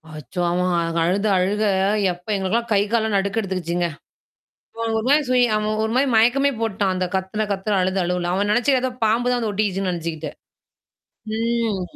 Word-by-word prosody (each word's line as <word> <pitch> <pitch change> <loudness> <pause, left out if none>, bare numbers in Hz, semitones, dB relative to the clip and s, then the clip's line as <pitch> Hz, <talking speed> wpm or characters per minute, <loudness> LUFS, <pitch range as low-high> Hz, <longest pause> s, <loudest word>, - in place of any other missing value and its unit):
அச்சோ! 150 +4 -6
அவன் 175 -2 0
அழுத 190 +5 0
அழுக 200 +4 0 0.5
எப்ப 175 +1 -17
எங்களுக்கெல்லாம் 200 +5 -1
கை 200 - +4
காலில் 220 -2 +1
நடுக்கம் 200 +3 0
எடுத்துக்கீச்சிங்க. 175 -3 -2 0.9
அவன் 230 -1 -2
ஒரு 220 - -3
மாதிரி 295 +2 +5
சுயி 250 -1 +4
அவன் 215 0 -1
ஒரு 220 - -2
மாதிரி 275 +2 +3
மயக்கமே 250 +5 +4
போட்டான், 200 -4 0
அந்தத் 185 0 -3
கத்துன 190 +3 -2
கத்துல 200 +1 -1
அழுத 190 +1 0
அழுகையில 175 0 -1
அவன் 205 +2 0
நினைச்சி 260 +4 +3
ஏதோ 260 0 -1
பாம்பு 235 +3 +2
தான் 250 - +1
வந்து 225 -2 -1
ஒட்டிடுச்சின்னு 195 -2 -1
நினைச்சிட்டு. 165 -2 -4 1.1
ம். 230 -4 0
200 Hz, 165 wpm, -22 LUFS, 180-225 Hz, 1.1 s, மாதிரி